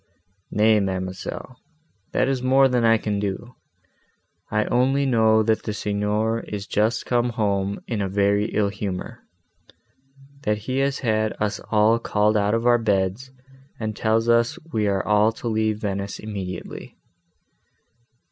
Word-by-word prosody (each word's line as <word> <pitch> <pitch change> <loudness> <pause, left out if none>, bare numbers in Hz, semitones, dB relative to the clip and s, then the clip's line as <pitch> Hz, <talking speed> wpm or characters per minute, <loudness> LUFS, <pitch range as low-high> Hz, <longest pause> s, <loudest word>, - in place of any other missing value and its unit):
"Nay, 110 +1 +4
ma'amselle, 95 +6 -4 0.5
that - - +1
is 135 -2 -1
more 135 +1 +5
than 125 -2 +1
I 115 0 +5
can 105 -2 -2
do. 105 +5 -4 1.0
I 105 0 +1
only 135 +3 +2
know 110 -3 +4
that 110 0 +1
the 105 - -4
Signor 105 +2 -1
is 105 -3 -6
just 110 +3 0
come 120 0 +1
home 100 -4 -1
in 110 -4 -3
a 100 - -1
very 100 +1 +2
ill 105 -2 0
humour, 100 -2 -5 1.2
that 105 -3 0
he 130 +5 -3
has 140 0 +1
had 110 -3 0
us 105 -1 -1
all 110 +1 +4
called 105 -1 +1
out 105 +1 +2
of 115 +1 -1
our 120 -1 +5
beds, 100 +3 0 0.5
and 110 -1 -3
tells 110 +2 +1
us 115 0 +3 0.2
we 105 -2 +1
are 100 -1 0
all 105 +1 +3
to 120 - -7
leave 110 -1 0
Venice 100 -1 -3
immediately." 95 -4 -7
110 Hz, 145 wpm, -23 LUFS, 100-115 Hz, 1.2 s, more